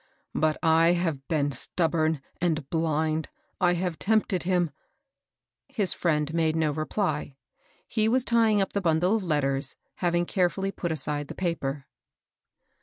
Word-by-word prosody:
But 155 -1 +1
I 165 +1 +5
have 165 -6 -2
been 145 -3 +1
stubborn 160 +2 +1 0.2
and 160 -5 0
blind; 160 -1 0 0.3
I 175 -1 +4
have 175 -2 -2
tempted 215 -3 +1
him 175 -3 +1 0.3
" - - -61
— - - -64 0.3
His 200 -5 +1
friend 155 -3 0
made 160 -1 +1
no 160 -2 +1
reply. 155 -1 -2 0.5
He 220 -1 +1
was 255 +2 +2
tying 225 -3 +3
up 190 - -6
the 200 - 0
bundle 175 +3 +2
of 210 - -5
letters, 140 -5 0 0.2
having 175 -1 +1
careftJly 190 +2 0
put 175 - -2
aside 145 -1 -2
the - - -8
paper. 145 -6 -2
165 Hz, 150 wpm, -27 LUFS, 155-185 Hz, 0.5 s, I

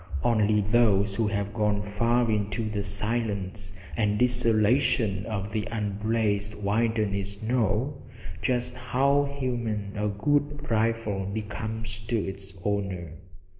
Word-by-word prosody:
Only 105 -2 +3
those 105 -2 +3
who 110 +1 +1
have 100 -1 -2
gone 105 -2 +1
far 115 +3 +2
into 105 +2 -1
the 105 -1 -2
silence 100 -2 -2 0.2
and 105 -2 +1
desolation 115 -3 +2
of 100 -2 -3
the 105 -1 -2
unblazed 105 -1 0
wilderness 105 -1 0
know 120 +4 0 0.4
just 125 -1 0
how 135 +3 +2
human 120 -7 -3
a 105 0 0
good 145 +8 0
rifle 110 -3 +1
becomes 110 +1 -4
to 120 -1 +1
its 95 -1 -4
owner. 95 -5 -2
110 Hz, 115 wpm, -27 LUFS, 100-115 Hz, 0.4 s, Only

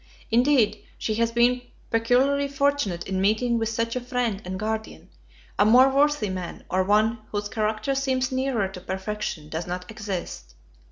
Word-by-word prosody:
Indeed 235 -3 +3
she 220 - -2
has 230 0 +2
been 240 +2 +3 0.3
peculiarly 255 +5 +2
fortunate 280 -11 0
in 190 0 -1
meeting 230 +4 +2
with 225 -1 -1
such 230 +1 -2
a 250 - -1
friend 245 -5 -1
and 185 +1 -5
guardian; 220 +1 -4 0.5
a - - +7
more 250 +5 +7
worthy 285 -5 +2
man, 185 -2 -6
or 185 +1 +2
one 215 +4 +2
whose 205 0 -2
character 215 +5 -1
seems 265 -1 0
nearer 260 -6 0
to 190 -1 -10
perfection, 190 -4 -4
does 160 +3 -4
not 180 +2 -5
exist. 185 - -6
220 Hz, 160 wpm, -25 LUFS, 195-250 Hz, 0.5 s, a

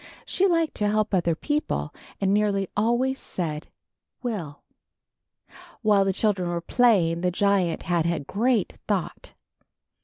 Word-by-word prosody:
She 390 - +2
liked 330 -3 +1
to 210 - +1
help 215 0 0
other 170 -3 +2
people, 295 - -2 0.3
and 195 0 +1
nearly 200 -2 +1
always 240 +5 +1
said, 155 -4 -4 0.6
will.'' 185 - -5 1.2
While 205 -2 +4
the 195 - +2
children 190 -3 0
were 175 0 -1
playing, 175 -5 +2
the 180 - +2
giant 190 -2 +1
had 170 -1 +1
a 170 -1 0
great 225 - 0
thought. - - -3
200 Hz, 130 wpm, -25 LUFS, 175-225 Hz, 1.2 s, While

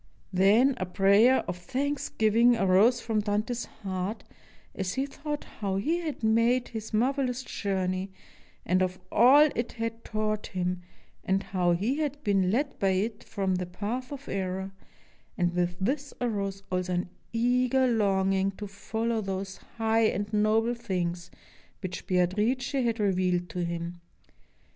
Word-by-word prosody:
Then 210 +9 +5
a 185 - -3
prayer 200 +8 +4
of 180 - -4
thanksgiving 245 -1 +2
arose 205 +4 +4
from 225 -2 0
Dante's 215 +3 -1
heart 190 0 -5 0.5
as 190 -2 -3
he 265 +1 0
thought 295 +1 -5
how 195 -2 -4
he 300 - +1
had 310 -8 -5
made 230 +3 +3
his 220 -2 -6
mar 240 +5 +2
velous 255 -2 -2
journey, 190 -3 -2 0.5
and 185 0 +2
of 185 0 0
all 270 +7 +7
it 235 0 -2
had 230 0 -4
taught 215 -1 -2
him, 180 0 -2 0.4
and 190 +1 +1
how 180 -2 +1
he 215 +11 0
had 290 -1 -2
been 195 -5 +2
led 275 +8 -1
by 195 -1 +2
it 210 +3 -2
from 195 -3 -1
the 180 -1 -2
path 215 +9 -4
of 280 -1 -8
error; 190 0 -3 0.7
and 175 -1 +1
with 175 0 0
this 275 +8 -2
arose 200 -5 -2
also 185 0 -1
an 175 0 -1 0.2
eager 250 +3 +2
longing 195 -4 +2
to 205 - -7
follow 220 +3 -2
those 195 -1 -4 0.2
high 225 0 +3
and 205 0 -1
noble 215 +3 +2
things 180 -6 -3 0.5
which 180 0 -5
Beatrice 210 +7 +1
had 240 -5 0
revealed 180 -3 +1
to 175 +2 -3
him. 170 0 -4
210 Hz, 150 wpm, -28 LUFS, 185-240 Hz, 0.7 s, all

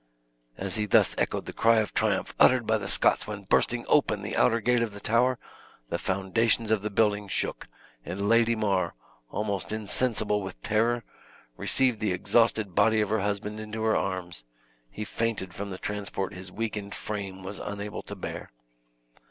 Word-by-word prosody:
As 95 +1 -2
he 105 0 -1
thus - - +4
echoed - - -1
the - - -7
cry 115 0 +4
of 110 -2 0
triumph - - 0
uttered 125 -2 +6
by 110 0 +2
the 100 - -5
Scots - - +2
when 105 -1 -6
bursting 120 +5 +1
open 105 -8 +2
the 105 - -4
outer 115 - +3
gate 120 +2 +2
of 115 -3 -1
the 100 - -9
tower, 120 +4 +2 0.5
the 85 - -2
foundations 110 +4 +1
of 110 -2 +2
the 105 - -2
building 105 -1 +1
shook, - - -2 0.4
and 100 +6 -3
Lady 115 +1 +4
Mar, 95 -5 0 0.3
almost 100 -2 -3
insensible 110 -1 0
with 95 -1 -7
terror, 115 +2 +1 0.5
received 130 - +3
the 105 -4 0
exhausted 110 +1 +2
body 110 +3 +4
of 105 -2 +1
her 110 +1 +1
husband 105 +1 -2
into 110 +1 -5
her 110 0 +3
arms; 90 -9 -2 0.5
he 105 - -6
fainted 105 -4 -2
from 100 +2 -5
the 95 - -5
transport 100 -2 -3
his 90 +1 -8
weakened 105 -1 -4
frame 100 -3 -5
was 95 +1 -5
unable 105 0 -5
to - - -8
hear. - - -6
105 Hz, 175 wpm, -27 LUFS, 100-110 Hz, 0.5 s, uttered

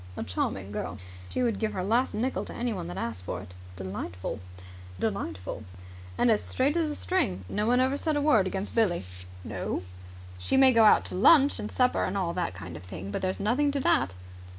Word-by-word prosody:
"A - - -2
charming 95 +1 -2
girl." 105 - -4 0.3
"She 255 - -1
would 230 -4 0
give 220 -1 -1
her 185 - -2
last 235 +6 +1
nickel 250 +5 -1
to - - -8
anyone 235 - -2
that 90 +1 -6
asked 115 -6 -3
for - - -4
it." 90 - -11 0.2
"Delightful!" 95 0 -5 1.8
"And 240 - +4
as 215 - +3
straight 275 +4 +1
as 330 -2 +1
a 295 - -2
string. 95 - 0
No 210 +1 -1
one 245 +1 +4
ever 260 +2 +2
said 310 0 0
a - - +2
word 225 -11 +4
against 190 +2 -4
Billie." 195 - +2 0.4
"No?" 90 - -3 0.6
"She 90 - +1
may 265 -1 +7
go 225 -1 +6
out 210 - +6
to - - -7
lunch 280 - +6
and 210 - -5
supper 250 -1 +2
and 195 - -1
all 175 -3 -1
that 175 -1 -2
kind 85 -1 -8
of 80 - -8
thing, 95 +2 -7
but - - -3
there's 185 0 -1
nothing 250 +8 +2
to 280 - 0
that." 95 - +2
210 Hz, 205 wpm, -28 LUFS, -, 1.8 s, may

